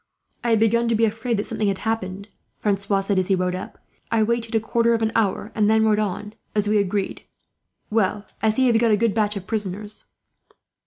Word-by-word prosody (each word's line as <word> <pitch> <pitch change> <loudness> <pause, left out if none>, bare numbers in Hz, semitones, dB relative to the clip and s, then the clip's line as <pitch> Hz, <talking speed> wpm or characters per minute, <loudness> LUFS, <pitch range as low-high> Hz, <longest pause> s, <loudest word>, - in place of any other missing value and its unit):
"I 240 - 0
had 225 -2 +4
begun 235 +2 +3
to 230 - +2
be 225 +1 +3
afraid 225 +2 -1
that 205 - 0
something 215 - -2
had 195 -1 0
happened," 200 -2 -3 0.3
Francois 200 -1 0
said, 195 -1 +1
as 185 - -1
he 195 - +3
rode 180 0 -1
up. 185 - -6 0.3
"I 225 -1 +2
waited 230 0 -1
a - - +4
quarter 230 +1 +2
of 225 - -1
an 220 - +1
hour 210 +1 0
and 210 -1 +2
then 220 0 +4
rode 215 -1 +3
on, 210 0 -3 0.2
as 210 -1 +1
we 210 0 +3
agreed. 200 0 -1 0.7
"Well, 210 -1 +1 0.2
I 220 - +3
see 260 +5 +2
you 245 - +5
have 225 - +3
got 235 - +4
a 210 - +4
good 230 -1 +1
batch 215 -1 +1
of 195 -2 -6
prisoners." 210 0 -4
215 Hz, 225 wpm, -23 LUFS, 200-225 Hz, 0.7 s, you